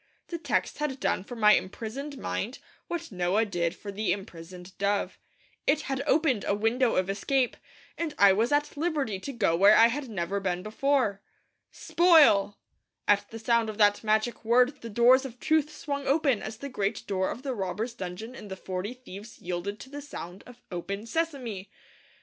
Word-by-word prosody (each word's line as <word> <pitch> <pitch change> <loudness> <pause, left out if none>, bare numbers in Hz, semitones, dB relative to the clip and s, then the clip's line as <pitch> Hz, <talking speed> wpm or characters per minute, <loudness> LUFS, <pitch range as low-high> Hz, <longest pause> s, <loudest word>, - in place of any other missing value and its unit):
The 340 - -4
text 320 - -1
had 285 -3 -2
done 185 - 0
for 245 - -8
my 210 -2 +6
imprisoned 245 +10 -3
mind 245 -1 -3 0.3
what 335 -4 -5
Noah 185 +4 +1
did 175 -5 -1
for 205 - -8
the 210 +1 -1
imprisoned 180 -1 -7
dove. 200 0 0 0.5
It 300 +2 +3
had 275 -2 -3
opened 285 -9 +2
a 200 - 0
window 225 +4 +1
of 185 0 +1
escape, 250 +6 0 0.4
and 330 -3 -3
I 200 -1 +7
was 225 +6 +1
at 290 0 +1
liberty 290 - -1
to 275 - -6
go 205 -10 +1
where 200 +4 +7
I 230 +1 +7
had 270 +1 -4
never 195 -1 -2
been 180 -2 -2
before. 220 -2 0 0.5
'Spoil!' 320 - +4 0.5
at 205 0 +3
the 225 - -8
sound 230 0 +1
of 215 - -6
that 205 -1 +4
magic 220 +2 0
word 250 +5 +3
the 230 - -7
doors 240 +4 +5
of 250 -3 -8
truth 310 -2 +2
swung 280 -2 -4
open 275 -5 +2
as 215 0 -6
the 280 - -6
great 205 -3 -2
door 190 -2 -1
of 250 - -6
the 270 -2 -2
robbers' 215 +3 -3
dungeon 195 +3 -7
in 215 - -10
The 190 -1 -7
Forty 190 +6 -5
Thieves 220 -3 -11
yielded 180 +4 -4
to 265 - -11
the 290 0 -6
sound 190 -10 -8
of 245 0 -15
'Open, 200 +4 -4
Sesame!' 250 - -3
225 Hz, 185 wpm, -28 LUFS, 200-270 Hz, 0.5 s, I